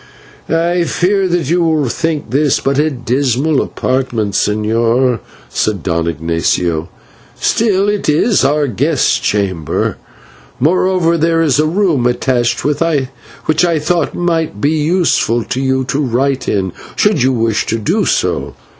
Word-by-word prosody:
"I 170 +1 +1
fear 190 +3 +1
that 175 -5 -1
you 175 +1 +2
will 160 -4 +1
think 155 -1 -2
this 140 +1 +2
but 135 +1 0
a 155 +1 +2
dismal 130 +2 0
apartment, 120 -6 -2
señor," 115 +4 +1 0.3
said 105 -5 -2
Don 85 -2 -1
Ignatio, 85 0 -1 0.5
"still 205 -3 +1
it 205 -5 -1
is 195 +8 +2
our 150 +1 +2
guest 140 +4 +1
chamber; 95 -7 -1 0.6
moreover, 170 +2 +2
there 165 +1 +2
is 145 -3 +2
a 155 - +3
room 165 -8 +1
attached 120 -1 0
which 145 0 -1
I 170 -2 +2
thought 170 +3 -1
might 165 -10 -1
be 145 +7 +1
useful 155 -7 +1
to 130 - -3
you 130 0 +1
to 135 +2 -2
write 135 0 0
in, 95 -3 -1 0.2
should 205 -9 +2
you 130 +1 +3
wish 115 -3 0
to 115 - 0
do 110 - 0
so. - - -1
140 Hz, 140 wpm, -15 LUFS, 115-165 Hz, 0.6 s, a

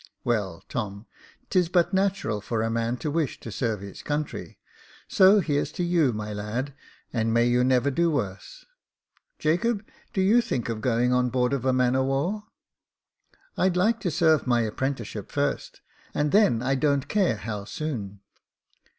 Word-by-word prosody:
*' - - -53
Well, 105 -8 -1
Tom, 105 -2 -4 0.5
'tis 180 -3 +3
but 180 +1 +2
natural 190 - 0
for 110 +1 -2
a 115 - -1
man 115 +1 -1
to 150 +3 -3
wish 155 -3 -1
to 115 - -7
serve 110 -2 -2
his 100 -1 -9
country; 150 0 -4 0.5
so 195 +2 +6
here's 145 -4 -1
to 180 - -2
you, 170 -6 +3
my 105 -1 -5
lad, 110 +7 -3 0.4
and 115 -1 0
may 115 +1 +3
you 120 +1 +3
never 130 +2 +3
do 170 +5 +2
worse! 125 - -4 0.7
Jacob, 205 +7 0 0.3
do - - -2
you 210 +6 +5
think 120 - -3
of 110 -2 -3
going 125 +1 +2
on 125 0 +2
board 125 +1 +1
of 135 -2 -2
a 130 - +4
man 125 -1 +2
of 130 0 +1
war? 175 +11 -1 0.4
" - - -62
" - - -35
I'd 185 -1 +2
like 220 +5 +2
to 190 - -1
serve 160 -2 +3
my 120 -1 +3
apprenticeship 120 +2 -3
first, - - -2 0.3
and 150 0 +1
then 160 - +4
I 135 +1 +1
don't 140 0 +1
care 195 - +2
how 105 0 -5
soon." 105 -9 -5
130 Hz, 175 wpm, -26 LUFS, 115-170 Hz, 0.7 s, so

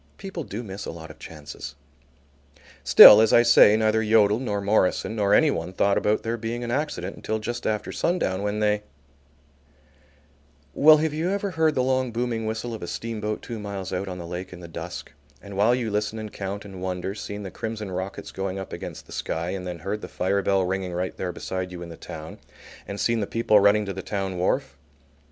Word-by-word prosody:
People 190 -4 -6
do 115 -1 -6
miss 100 -2 -7
a - - -4
lot 80 -1 -10
of - - -17
chances. 75 -3 -9 1.1
Still, 105 - +10
as 110 - +3
I 120 - +6
say, 110 -2 +7
neither 110 0 +2
Yodel 105 -1 +4
nor 105 -6 -2
Morison 100 +1 +1
nor 100 -2 +1
anyone 95 - +2
thought 100 +1 +2
about 105 +1 +1
there 115 +1 -2
being 115 +2 -4
an 120 - -3
accident 125 - -2
until 110 - -3
just 120 +2 -4
after 105 -1 -2
sundown 100 - 0
when 105 +1 -2
they 105 0 +2 1.9
Well, 155 - +7
have 155 0 0
you 160 +4 -1
ever 200 0 -1
heard 160 -2 +2
the 130 - +2
long 130 -1 0
booming 115 -1 -2
whistle 110 +2 -3
of 110 - -7
a 85 - -5
steamboat 110 -1 -4
two 115 -2 -6
miles 100 -3 -5
out 95 +2 -2
on 90 -1 -5
the 85 - -7
lake 90 +2 -6
in 90 - -10
the 85 - -9
dusk, 85 +1 -7 0.3
and 100 -1 -10
while 110 +5 +4
you 120 -4 -2
listen 105 +1 -1
and 110 -1 -7
count 100 +1 -5
and 95 -2 -9
wonder, 95 +1 -3
seen 105 0 -6
the 95 - -7
crimson 110 -3 -5
rockets 95 +2 -5
going 95 0 -4
up 95 - -7
against - - -7
the - - -17
sky 85 +2 -3
and 95 -1 -5
then 90 -1 -5
heard 100 +6 -4
the - - -6
fire 95 +2 0
bell 95 -1 +2
ringing 95 -1 -2
right 90 +1 -3
there 90 - -3
beside 95 0 -5
you 90 -1 -7
in 85 - -9
the 85 - -9
town, 80 +1 -9 0.5
and 100 0 -6
seen 115 -1 +1
the 100 - -2
people 115 -2 +3
running 100 +1 +4
to 100 - -4
the 95 - -6
town 95 -2 -3
wharf? 90 - -1
105 Hz, 215 wpm, -25 LUFS, 95-115 Hz, 1.9 s, Still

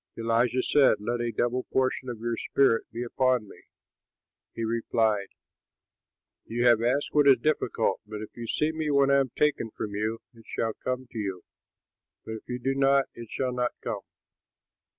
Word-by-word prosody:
Elisha 115 +2 +1
said, 140 -6 +5
"Let 120 +3 -2
a 120 0 -1
double 120 +3 0
portion 130 0 0
of 120 - -4
your 120 0 -1
spirit 115 -1 +2
be 120 - -4
upon 125 -2 +1
me." - - -15 0.9
He 115 - -3
replied, 110 -2 +1 1.2
"You 120 +2 -1
have 120 -2 +6
asked 125 +5 +1
what 145 -1 +4
is 135 - +8
difficult; 155 0 0
but 105 0 -6
if 110 - -9
you 120 -1 -6
see 150 +7 +1
me 160 -1 -2
when 140 -1 +4
I 140 - +5
am 135 -1 0
taken 150 -6 +1
from 105 -1 -5
you, 110 +2 -2 0.2
it 115 -2 -18
shall 115 -1 -2
come 130 0 -2
to 115 - -5
you; 95 -4 -4 0.8
but - - -6
if 110 - -8
you 125 - -2
do 135 +2 -1
not, 135 0 +3
it 115 -2 -10
shall 130 -1 -2
not 125 -1 -1
come." 110 -4 -3
120 Hz, 180 wpm, -27 LUFS, 115-130 Hz, 1.2 s, is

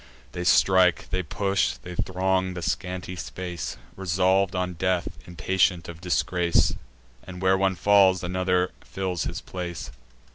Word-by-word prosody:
They 90 - -4
strike, 90 0 +4
they 95 - 0
push, 100 +3 0
they 90 - -9
throng 95 +1 0
the 85 - -5
scanty 90 0 -3
space, 85 +3 -5 0.2
Resolv'd 95 +1 +1
on 90 0 -1
death, 90 +1 0 0.2
impatient 90 0 +1
of 85 -1 -9
disgrace; 90 -1 +1 0.5
And, 90 -1 -9
where 95 0 +3
one 95 0 +1
falls, 95 0 +4
another 90 0 0
fills 90 -4 -3
his - - -4
place. 85 -6 -6
90 Hz, 135 wpm, -25 LUFS, 90-95 Hz, 0.5 s, strike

